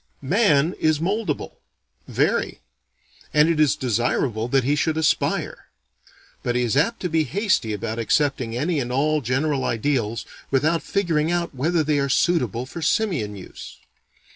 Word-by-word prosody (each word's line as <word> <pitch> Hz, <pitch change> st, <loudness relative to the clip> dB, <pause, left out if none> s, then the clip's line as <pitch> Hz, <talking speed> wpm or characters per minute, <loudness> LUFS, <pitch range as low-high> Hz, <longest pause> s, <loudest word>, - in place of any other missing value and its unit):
Man 160 Hz, -, +3 dB
is 155 Hz, -1 st, +2 dB
moldable; 190 Hz, -2 st, -2 dB, 0.5 s
very; -, -, 0 dB, 0.8 s
and 150 Hz, +1 st, +6 dB
it 165 Hz, -2 st, +1 dB
is 150 Hz, -8 st, +4 dB
desirable 120 Hz, -1 st, 0 dB
that 135 Hz, +1 st, +2 dB
he 140 Hz, +4 st, +1 dB
should 155 Hz, +2 st, 0 dB
aspire. 160 Hz, -1 st, 0 dB, 0.7 s
But 120 Hz, -, -2 dB
he 125 Hz, -, +2 dB
is 120 Hz, 0 st, 0 dB
apt 190 Hz, +12 st, +1 dB
to 180 Hz, -, -1 dB
be 160 Hz, -2 st, +1 dB
hasty 200 Hz, -, 0 dB
about 110 Hz, +2 st, -4 dB
accepting 125 Hz, -1 st, 0 dB
any 155 Hz, +4 st, 0 dB
and 125 Hz, -2 st, -3 dB
all 150 Hz, +4 st, +1 dB
general 135 Hz, +3 st, 0 dB
ideals 115 Hz, -2 st, -1 dB, 0.2 s
without 155 Hz, +5 st, +1 dB
figuring 165 Hz, -5 st, 0 dB
out 175 Hz, -2 st, -1 dB
whether 160 Hz, +5 st, +1 dB
they 150 Hz, -1 st, +1 dB
are 140 Hz, 0 st, 0 dB
suitable 130 Hz, -, +1 dB
for 165 Hz, +6 st, -8 dB
simian 160 Hz, -, 0 dB
use. 95 Hz, -, -10 dB
145 Hz, 150 wpm, -23 LUFS, 125-165 Hz, 0.8 s, and